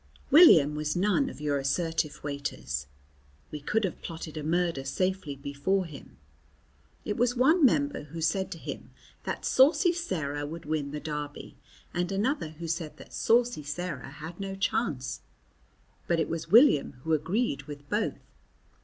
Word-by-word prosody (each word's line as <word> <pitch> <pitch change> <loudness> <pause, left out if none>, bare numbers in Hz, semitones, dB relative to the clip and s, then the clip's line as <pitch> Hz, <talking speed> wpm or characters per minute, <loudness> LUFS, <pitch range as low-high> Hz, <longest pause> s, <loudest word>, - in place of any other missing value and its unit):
William 165 - +8
was 150 0 -2
none 210 +9 +2
of - - -10
your 145 -1 0
assertive 155 +2 -1
waiters. 70 - -4 0.6
We 150 - -5
could 215 +9 0
have 190 - -3
plotted 165 -2 -7
a 155 - -4
murder 165 -2 0
safely 165 +2 -1
before 140 +8 -1
him. 150 -5 -12 0.9
It 205 - -2
was 245 +1 +2
one 305 +7 +4
member 285 - +3
who 165 +3 -8
said 175 +4 0
to - - -10
him - - -7 0.4
that - - -3
Saucy 320 +7 +5
Sarah 155 - -3
would 165 +2 -8
win 150 -2 -1
the 150 +1 -5
Derby 150 -1 -6 0.4
and 175 +1 -1
another 205 - 0
who 160 +2 -8
said 160 -1 -3
that - - -14
Saucy 240 -6 +2
Sarah 150 -2 -5
had 160 +5 -9
no 195 -1 -4
chance, 195 - -1 0.9
but 170 -1 +2
it - - 0
was 165 0 -4
William 220 - +6
who 160 - 0
agreed 170 - 0
with 145 -1 -9
both. - - 0
165 Hz, 155 wpm, -28 LUFS, 145-195 Hz, 0.9 s, William